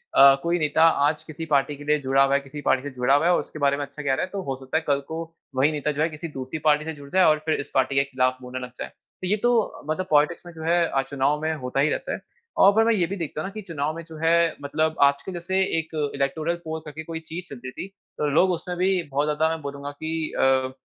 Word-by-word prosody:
अ, 135 Hz, 0 st, +9 dB
कोई 170 Hz, +1 st, +1 dB
नेता 155 Hz, +1 st, +2 dB, 0.2 s
आज 150 Hz, 0 st, -2 dB
किसी 160 Hz, +1 st, -7 dB
पार्टी 145 Hz, +1 st, +2 dB
के 145 Hz, -, -10 dB
लिए 150 Hz, 0 st, +2 dB
जुड़ा 135 Hz, +1 st, +3 dB
हुआ 135 Hz, 0 st, +2 dB
है, -, -, +3 dB
किसी 140 Hz, +2 st, -9 dB
पार्टी 135 Hz, -1 st, +2 dB
से 145 Hz, -, -4 dB
जुड़ा 125 Hz, +3 st, +3 dB
हुआ 150 Hz, +3 st, +2 dB
है। 175 Hz, -, +5 dB
और -, -, +3 dB
उसके 155 Hz, -, -8 dB
बारे 140 Hz, 0 st, +2 dB
में 145 Hz, -, -2 dB
अच्छा 150 Hz, -, -10 dB
कह 135 Hz, -1 st, +1 dB
रहा -, -, 0 dB
है, -, -, -12 dB
तो 200 Hz, -1 st, -3 dB
हो 135 Hz, -1 st, -3 dB
सकता 130 Hz, +4 st, -1 dB
है 160 Hz, -, -2 dB
कल 140 Hz, -1 st, +3 dB
को 160 Hz, +1 st, -4 dB, 0.3 s
वही 140 Hz, +4 st, +3 dB
नेता 150 Hz, 0 st, -1 dB
जो 150 Hz, +1 st, -3 dB
है 160 Hz, -, +2 dB
किसी 155 Hz, +2 st, -7 dB
दूसरी 130 Hz, +3 st, -5 dB
पार्टी 150 Hz, +1 st, +4 dB
से 160 Hz, -, -3 dB
जुड़ 140 Hz, -1 st, -12 dB
जाए 185 Hz, +2 st, +4 dB
और 155 Hz, -1 st, +4 dB
फिर 155 Hz, -, +1 dB
इस 145 Hz, -, -5 dB
पार्टी 135 Hz, +1 st, +1 dB
के 140 Hz, -, +4 dB
खिलाफ 130 Hz, -1 st, 0 dB
बोलने 125 Hz, +1 st, -6 dB
लग 125 Hz, -, -13 dB
जाए। -, -, -4 dB
तो 185 Hz, -, -11 dB
ये 210 Hz, +3 st, +2 dB
तो 240 Hz, -3 st, +1 dB
मतलब 185 Hz, +4 st, -1 dB
पॉलिटिक्स 150 Hz, +4 st, +2 dB
में 175 Hz, -, -9 dB
जो 160 Hz, -, -9 dB
है, 165 Hz, -5 st, +2 dB
चुनाव 140 Hz, +2 st, +1 dB
में 160 Hz, 0 st, 0 dB
होता 130 Hz, -1 st, -3 dB
ही 150 Hz, +2 st, +4 dB
रहता -, -, -2 dB
है। -, -, -4 dB, 0.4 s
और 205 Hz, +3 st, +6 dB
मैं 230 Hz, -, +4 dB
ये 180 Hz, -5 st, +2 dB
भी 200 Hz, -, -4 dB
देखता 155 Hz, -2 st, -4 dB
हूँ 190 Hz, -, -4 dB
ना, 195 Hz, -, -7 dB
कि 215 Hz, -, -6 dB
चुनाव 155 Hz, -4 st, -3 dB
में 165 Hz, -, -7 dB
जो 160 Hz, -, -9 dB
है 170 Hz, 0 st, +3 dB
मतलब 155 Hz, +2 st, 0 dB
आजकल 140 Hz, +6 st, +2 dB
जैसे 190 Hz, +2 st, -1 dB, 0.2 s
एक 160 Hz, 0 st, -4 dB, 0.2 s
इलेक्टोरल 155 Hz, +5 st, -1 dB
पोल 160 Hz, 0 st, -3 dB
करके 155 Hz, +1 st, -7 dB
कोई 165 Hz, 0 st, -5 dB
चीज़ 175 Hz, +2 st, -6 dB
चलती 130 Hz, -1 st, -8 dB
थी। 195 Hz, -, -8 dB, 0.4 s
लोग 185 Hz, +5 st, +4 dB
उसमे 180 Hz, +1 st, -3 dB
भी 185 Hz, 0 st, +1 dB
बहुत 145 Hz, +2 st, +1 dB
ज्यादा 155 Hz, +2 st, +2 dB
मैं 160 Hz, -1 st, -3 dB
बोलूँगा 140 Hz, 0 st, -6 dB
की 160 Hz, +2 st, -3 dB
अ, 130 Hz, -1 st, +2 dB
150 Hz, 275 wpm, -24 LUFS, 140-165 Hz, 0.4 s, अ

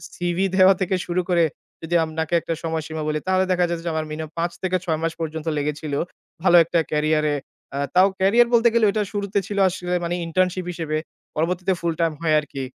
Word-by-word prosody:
CV 175 Hz, +2 st, 0 dB
দেওয়া 190 Hz, 0 st, +7 dB
থেকে 190 Hz, +1 st, +1 dB
শুরু 180 Hz, +1 st, 0 dB
করে 170 Hz, -1 st, +4 dB, 0.4 s
যদি 170 Hz, +1 st, -2 dB
আপনাকে 160 Hz, +1 st, -3 dB
একটা 165 Hz, -, -3 dB
সময়সীমা 160 Hz, -1 st, -3 dB
বলি 155 Hz, 0 st, 0 dB
তাহলে 185 Hz, 0 st, +3 dB
দেখা 180 Hz, -1 st, +3 dB
যেত 170 Hz, -1 st, -2 dB
যে 170 Hz, -, 0 dB
আমার 160 Hz, 0 st, -1 dB
মিনিমাম 155 Hz, 0 st, -5 dB
৫ 170 Hz, +1 st, 0 dB
থেকে 185 Hz, 0 st, +1 dB
৬ 160 Hz, -3 st, 0 dB
মাস 165 Hz, 0 st, -1 dB
পর্যন্ত 160 Hz, 0 st, -4 dB
লেগেছিল। 150 Hz, 0 st, -3 dB, 0.5 s
ভালো 175 Hz, -, +5 dB
একটা 170 Hz, +1 st, 0 dB
ক্যারিয়ারে। 150 Hz, 0 st, +1 dB, 0.4 s
আ -, -, -2 dB, 0.2 s
তাও 185 Hz, +1 st, +7 dB
ক্যারিয়ার 225 Hz, +6 st, +5 dB
বলতে 235 Hz, 0 st, +5 dB
গেলে 235 Hz, -2 st, +4 dB
ঐটা 210 Hz, 0 st, 0 dB
শুরুতে 200 Hz, 0 st, -1 dB
ছিল 205 Hz, -, -4 dB
আসলে 180 Hz, 0 st, -4 dB
মানে 170 Hz, +1 st, -1 dB
ইন্টার্নশিপ 185 Hz, +1 st, 0 dB
হিসেবে, 160 Hz, -3 st, -3 dB, 0.4 s
পরবর্তীতে 180 Hz, +4 st, 0 dB
ফুল 170 Hz, -1 st, 0 dB
টাইম 165 Hz, -1 st, +2 dB
হয় 160 Hz, -2 st, +2 dB
আরকি। 140 Hz, -3 st, -6 dB
170 Hz, 195 wpm, -23 LUFS, 160-185 Hz, 0.5 s, দেওয়া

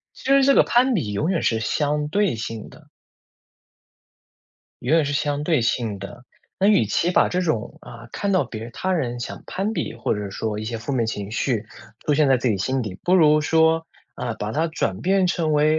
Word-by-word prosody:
其 -, -, -15 dB
实 275 Hz, 0 st, +6 dB
这 275 Hz, 0 st, +5 dB
个 -, -, +7 dB
攀 250 Hz, +1 st, +3 dB
比 110 Hz, -, -1 dB
永 155 Hz, -, 0 dB
远 175 Hz, -, 0 dB
是 110 Hz, -1 st, +1 dB
相 150 Hz, +4 st, 0 dB
对 200 Hz, -, +1 dB
性 110 Hz, -1 st, -6 dB
的。 -, -, -18 dB, 1.9 s
永 140 Hz, +7 st, +2 dB
远 160 Hz, -, +3 dB
是 145 Hz, -, -2 dB
相 145 Hz, 0 st, -1 dB
对 155 Hz, -4 st, +2 dB
性 115 Hz, -3 st, -1 dB
的。 120 Hz, +6 st, -10 dB, 0.3 s
那 195 Hz, -, +3 dB
与 205 Hz, -, +4 dB
其 170 Hz, -, +1 dB
把 -, -, +3 dB
这 180 Hz, -, -1 dB
种， 155 Hz, -11 st, -2 dB
啊， 120 Hz, 0 st, -12 dB
看 200 Hz, -1 st, -1 dB
到 185 Hz, -, +3 dB
别 115 Hz, +1 st, -7 dB
他 185 Hz, +9 st, -2 dB
人 120 Hz, -8 st, -2 dB
想 -, -, -6 dB
攀 200 Hz, +4 st, -2 dB
比， 115 Hz, -, -3 dB
或 115 Hz, -, -1 dB
者 105 Hz, -2 st, -5 dB
说 105 Hz, +1 st, -3 dB
一 110 Hz, -, -4 dB
些 115 Hz, +1 st, -3 dB
负 140 Hz, +5 st, -5 dB
面 120 Hz, -4 st, +1 dB
情 105 Hz, -2 st, -4 dB
绪， 115 Hz, -1 st, -1 dB, 0.4 s
出 150 Hz, -, +2 dB
现 150 Hz, -1 st, +3 dB
在 130 Hz, -, +5 dB
自 125 Hz, 0 st, -1 dB
己 105 Hz, -, +1 dB
心 130 Hz, +5 st, -1 dB
底， 95 Hz, -4 st, -6 dB
不 180 Hz, -, +3 dB
如 155 Hz, -4 st, +5 dB
说， 160 Hz, +1 st, +2 dB, 0.3 s
啊， 120 Hz, -2 st, -4 dB
把 105 Hz, 0 st, -4 dB
它 160 Hz, +5 st, +1 dB
转 95 Hz, -, -2 dB
变 190 Hz, +5 st, +2 dB
成 165 Hz, -3 st, 0 dB
为， 155 Hz, +1 st, +3 dB
145 Hz, 230 characters per minute, -23 LUFS, 115-165 Hz, 1.9 s, 个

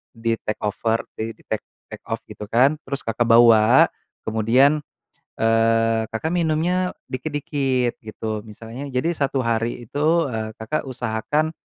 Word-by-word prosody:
di 115 Hz, 0 st, 0 dB
take 105 Hz, -, -3 dB
over, 110 Hz, +2 st, 0 dB
di 110 Hz, +1 st, -3 dB
di -, -, -23 dB
take 110 Hz, -, -2 dB, 0.3 s
take -, -, -10 dB
off -, -, -1 dB
gitu 105 Hz, -, -8 dB
kan, 130 Hz, +6 st, +4 dB
terus 140 Hz, +1 st, -4 dB
Kakak 115 Hz, +1 st, +1 dB
bawa, 115 Hz, +1 st, +7 dB, 0.4 s
kemudian, 125 Hz, +7 st, +3 dB, 0.6 s
eee, 115 Hz, 0 st, +3 dB
Kakak 115 Hz, +8 st, -2 dB
minumnya 175 Hz, +3 st, +1 dB, 0.2 s
dikit-dikit 135 Hz, -3 st, -1 dB
gitu. 110 Hz, -1 st, -5 dB
Misalnya 115 Hz, +6 st, -8 dB
jadi 130 Hz, +6 st, 0 dB
1 140 Hz, -2 st, 0 dB
hari 115 Hz, +1 st, -1 dB
itu, 155 Hz, +7 st, +2 dB
eee, 110 Hz, -1 st, -3 dB
Kakak 140 Hz, +6 st, -2 dB
usahakan 125 Hz, +6 st, -1 dB
120 Hz, 140 wpm, -22 LUFS, 110-145 Hz, 0.6 s, bawa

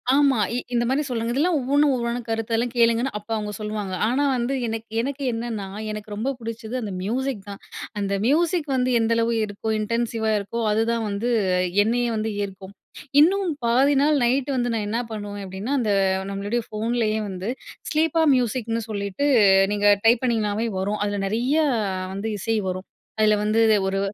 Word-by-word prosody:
ஆமா. 275 Hz, -5 st, +4 dB, 0.2 s
இ -, -, 0 dB, 0.2 s
இந்த 235 Hz, -, +2 dB
மாரி, 275 Hz, +4 st, +1 dB
சொல்றாங்க. 235 Hz, -2 st, -2 dB
இதெல்லாம் 310 Hz, +5 st, +2 dB
ஒவ்வொன்னும், 285 Hz, +2 st, +3 dB
ஒவ்வொன்னு 235 Hz, 0 st, -2 dB
கருத்தெல்லாம் 225 Hz, +2 st, -1 dB
கேளுங்கன்னு, 235 Hz, +2 st, +3 dB
அப்ப 210 Hz, +2 st, -24 dB
அவங்க 210 Hz, -1 st, -3 dB
சொல்லுவாங்க. 210 Hz, -2 st, -4 dB
ஆனா 260 Hz, +5 st, +1 dB
வந்து 240 Hz, +3 st, -1 dB
எனக்கு 225 Hz, 0 st, -5 dB
எனக்கு 275 Hz, +3 st, -4 dB
என்னன்னா, 225 Hz, -4 st, -4 dB, 0.2 s
எனக்கு 215 Hz, 0 st, -7 dB
ரொம்ப 225 Hz, +6 st, -2 dB
புடிச்சது 230 Hz, +1 st, -6 dB
அந்த 205 Hz, -3 st, -4 dB
மியூசிக் 245 Hz, +2 st, -2 dB
தான். 200 Hz, -, -8 dB, 0.4 s
அந்த 200 Hz, 0 st, -1 dB
மியூசிக் 320 Hz, +3 st, +2 dB
வந்து 255 Hz, 0 st, +1 dB
எந்த 225 Hz, 0 st, +2 dB
அளவு 230 Hz, 0 st, +1 dB
இருக்கோ, 205 Hz, +2 st, -5 dB
இன்டென்சிவா 225 Hz, 0 st, -1 dB
இருக்கோ, 215 Hz, +4 st, -4 dB
அதுதான் 225 Hz, +1 st, +1 dB
வந்து 205 Hz, +4 st, -2 dB, 0.5 s
என்னய 235 Hz, +1 st, 0 dB
வந்து 220 Hz, 0 st, -1 dB
ஈர்க்கும். 195 Hz, 0 st, -8 dB, 0.5 s
இன்னும் 380 Hz, +5 st, +4 dB, 0.2 s
பாதி 255 Hz, +5 st, +4 dB
நாள் 295 Hz, +1 st, +3 dB
நைட்டு 260 Hz, +3 st, +1 dB
வந்து 245 Hz, -1 st, 0 dB
நான் 215 Hz, -2 st, -1 dB
என்னா 225 Hz, +3 st, -1 dB
பண்ணுவேன் 205 Hz, -2 st, -5 dB
அப்படீன்னா, 195 Hz, +8 st, -4 dB
அந்த 215 Hz, -4 st, 0 dB, 0.4 s
நம்மளுடைய 205 Hz, +4 st, -2 dB
ஃபோன்லயே 220 Hz, 0 st, -1 dB
வந்து 185 Hz, +1 st, -5 dB, 0.4 s
ஸ்லீப்பா 320 Hz, +1 st, +2 dB
மியூசிக்ன்னு 230 Hz, -2 st, -1 dB
சொல்லீட்டு, 200 Hz, +6 st, -2 dB, 0.5 s
நீங்க 205 Hz, 0 st, -1 dB, 0.2 s
டைப் 230 Hz, +1 st, +5 dB
பண்ணீங்கனாவே 220 Hz, -2 st, 0 dB
வரும். 205 Hz, +3 st, -1 dB
அதுல 205 Hz, 0 st, -2 dB
நெறைய 240 Hz, +8 st, 0 dB, 0.6 s
வந்து 200 Hz, +3 st, -4 dB
இசை 225 Hz, +4 st, 0 dB
வரும். 185 Hz, +1 st, -5 dB, 0.3 s
அதுல 215 Hz, 0 st, +5 dB
வந்து 215 Hz, +2 st, +2 dB, 0.3 s
ஒரு 195 Hz, 0 st, 0 dB
230 Hz, 160 wpm, -23 LUFS, 210-250 Hz, 0.6 s, டைப்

